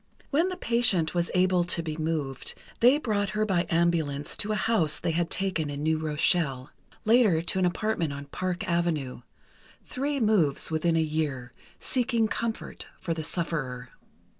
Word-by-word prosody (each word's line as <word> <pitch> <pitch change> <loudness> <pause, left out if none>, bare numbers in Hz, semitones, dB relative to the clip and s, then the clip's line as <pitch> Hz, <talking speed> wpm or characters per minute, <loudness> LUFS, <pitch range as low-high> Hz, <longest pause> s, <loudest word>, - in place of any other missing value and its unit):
When 325 +6 +2
the 365 - -5
patient 230 -9 +2
was 175 -1 0
able 180 -1 +3
to 170 -1 0
be 155 -2 -4
moved, 155 -4 -3 0.2
they 250 +5 +6
brought 210 -8 -1
her 215 - +2
by 180 -4 0
ambulance 165 -4 +1
to 210 - -1
a - - +1
house 195 -9 +2
they - - -1
had 165 +1 0
taken 185 -6 -1
in 145 0 -4
New 160 0 +1
Rochelle. 150 -3 +1 0.3
Later 220 -7 +5
to 175 +2 -1
an 180 - +3
apartment 175 -3 -1
on 140 0 -6
Park 185 +7 -3
Avenue—three 170 - -4
moves 195 - +2
within 165 +1 +1
a - - +3
year, 150 -6 -2 0.3
seeking 235 -3 +1
comfort 225 +1 -4
for 170 - -2
the 160 -1 -4
sufferer. 140 -7 -2
170 Hz, 160 wpm, -27 LUFS, 155-215 Hz, 0.3 s, they